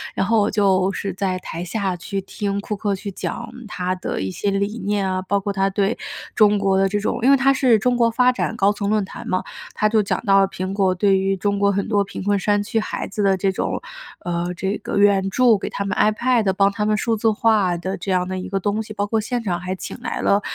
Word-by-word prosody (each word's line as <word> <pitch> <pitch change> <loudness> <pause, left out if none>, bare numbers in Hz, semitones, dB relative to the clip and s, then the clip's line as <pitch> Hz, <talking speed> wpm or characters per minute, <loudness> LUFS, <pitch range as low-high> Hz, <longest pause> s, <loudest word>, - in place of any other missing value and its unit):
然 - - +1
后 225 +1 +3
我 205 - +2
就 195 -2 +2
是 195 -3 -3
在 190 -1 -1
台 170 -1 -6
下 190 -1 -2
去 195 +2 -4
听 200 +1 -3
库 210 - -4
克 200 -1 -1
去 200 +1 -6
讲 235 +5 -5 0.2
他 185 -2 -2
的 180 - -4
一 95 - -2
些 200 - -2
理 200 +3 -1
念 200 -2 -1
啊， 185 0 -1
包 200 +2 0
括 200 +1 -3
他 195 0 +1
对 200 +3 0 0.4
中 210 -2 +5
国 195 -1 +2
的 195 0 +3
这 205 +1 0
种 210 - -2
因 265 - +5
为 275 - +6
他 270 +1 +4
是 255 -4 +4
中 250 +3 +1
国 235 -1 +4
发 250 +2 +4
展 235 -2 -2
高 200 +1 +4
层 205 0 -3
论 215 -1 +2
坛 - - -9
嘛， 185 - 0 0.3
他 215 - +2
就 215 0 +3
讲 - - -1
到 195 0 +5
了 195 - +4
苹 185 0 -5
果 190 -2 +2
对 195 +1 +3
于 195 0 0
中 200 +1 0
国 200 0 +3
很 200 +2 -1
多 205 -2 +2
贫 195 - -7
困 205 0 +2
山 205 +1 +1
区 225 +2 -1
孩 - - -4
子 210 0 -3
的 195 -1 +3
这 195 +1 +1
种 - - -2 0.4
呃， 175 +1 -2
这 195 +3 -2
个 - - -4
援 200 -1 +4
助， 240 0 +4
给 - - -5
他 200 - -4
们 - - -2
iPad， 215 -1 +2
帮 195 +1 +3
他 210 +1 -2
们 215 0 +2
数 230 +1 0
字 220 +1 +2
化 210 -5 +2
的 190 +3 -3
这 195 - -4
样 180 0 +1
的 185 0 -3
一 185 - -5
个 195 - -1
东 205 +3 -1
西， 215 - -9
包 205 0 -1
括 225 +1 +1
现 240 +2 -2
场 175 -4 -1
还 185 +1 -4
请 - - -7
来 - - -3
了 200 +1 +3
200 Hz, 290 characters per minute, -21 LUFS, 190-215 Hz, 0.4 s, 为